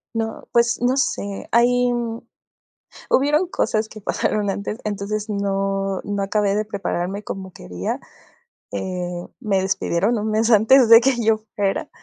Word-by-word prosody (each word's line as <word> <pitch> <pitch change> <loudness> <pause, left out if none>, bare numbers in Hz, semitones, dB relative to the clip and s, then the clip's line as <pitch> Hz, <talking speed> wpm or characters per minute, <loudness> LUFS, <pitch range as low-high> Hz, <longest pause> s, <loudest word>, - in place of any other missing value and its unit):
No, 225 0 -3
pues, 235 0 +2
no 250 +2 +2
sé, 200 -7 -2
hay 245 +1 +3
mm 235 -1 -3 0.9
hubieron 300 +6 +3
cosas 220 -9 -1
que 215 - -11
pasaron 205 0 0
antes, 205 +2 -4
entonces 210 +1 -3
no 195 -1 -1
no 205 -1 -2
acabé 200 0 +1
de 215 - +1
prepararme 200 -1 -3
como 190 -2 -6
quería. 90 - -5 0.7
Eh, 175 - -4
me 205 -6 0
despidieron 190 +3 0
un 215 +1 -2
mes 220 +2 +2
antes 230 +3 +6
de 230 0 +10
que 265 +2 +2
yo 220 0 +3 0.2
fuera. 200 -1 -1
210 Hz, 145 wpm, -21 LUFS, 195-230 Hz, 0.9 s, de